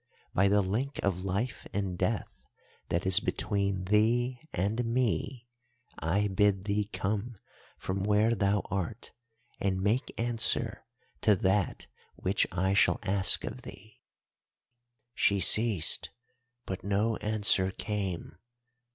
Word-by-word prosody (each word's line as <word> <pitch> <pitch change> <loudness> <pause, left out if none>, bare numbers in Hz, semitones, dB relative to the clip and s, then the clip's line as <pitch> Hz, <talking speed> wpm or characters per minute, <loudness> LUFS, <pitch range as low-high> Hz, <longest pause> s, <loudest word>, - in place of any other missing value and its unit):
"'By 95 +2 +4
the 100 0 +3
link 120 +9 -2
of 95 -2 0
life 100 +5 -3
and 100 -3 -2
death 100 +5 -3 0.4
that 85 +2 -1
is 95 +1 +4
between 100 -2 -1
thee 115 +5 +2
and 105 +7 -1
me, 120 +1 -1 0.5
I 100 +6 +1
bid 100 0 +2
thee 105 0 0
come 100 +4 -3 0.4
from 95 +1 -3
where 105 +3 +3
thou 100 -1 +1
art 100 +4 -4 0.5
and 95 -1 0
make 105 +8 0
answer 115 -1 0 0.3
to 105 - +4
that 95 0 0 0.3
which 95 +2 0
I 95 +2 +1
shall 100 - +3
ask 95 -1 +3
of - - -6
thee.' 110 +2 -13 1.1
"She 100 -3 +2
ceased, 100 -2 +3 0.6
but 95 - -5
no 105 +3 +1
answer 105 -3 +1
came. 95 -4 -4
100 Hz, 120 wpm, -30 LUFS, 95-110 Hz, 1.1 s, By